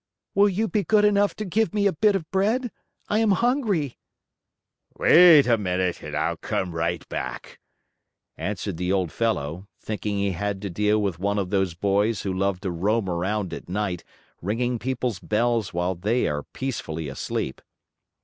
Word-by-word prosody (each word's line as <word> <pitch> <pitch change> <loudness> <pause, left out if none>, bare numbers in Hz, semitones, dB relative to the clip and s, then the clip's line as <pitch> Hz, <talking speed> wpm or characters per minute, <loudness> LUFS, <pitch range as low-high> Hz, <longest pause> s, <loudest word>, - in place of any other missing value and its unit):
"Will 205 +1 +5
you 210 +4 0
be 210 -1 0
good 210 +4 +4
enough 205 -3 +3
to 215 - -4
give 210 +3 0
me 205 -1 +2
a 200 - +3
bit 205 +5 +3
of 165 -5 -4
bread? 220 +6 +1 0.4
I 210 - +1
am 225 -1 +3
hungry." 215 - 0 1.0
"Wait 165 -4 +8
a 115 -2 +3
minute 90 -2 -1
and - - -6
I'll - - 0
come 90 - -2
right 85 +1 -2
back," - - -6 0.8
answered 95 +1 -4
the 90 +1 -1
old 95 -4 0
fellow, 90 -5 -2
thinking 105 -1 -3
he 100 0 +1
had 100 +2 -2
to 100 - -3
deal 105 +4 +2
with 100 -5 -1
one 100 +2 0
of 95 -2 -2
those 95 -4 +1
boys 100 +3 +1
who 95 - -2
love 95 0 -1
to 95 -3 -2
roam 100 +5 0
around 95 +2 -2
at - - -8
night 95 -2 -2 0.4
ringing 120 +5 -1
people's 125 -5 -2
bells 115 +1 0
while 90 +2 -1
they 105 +8 0
are 75 0 -1
peacefully 80 - -5
asleep. 65 -1 -4
105 Hz, 170 wpm, -24 LUFS, -, 1.0 s, Wait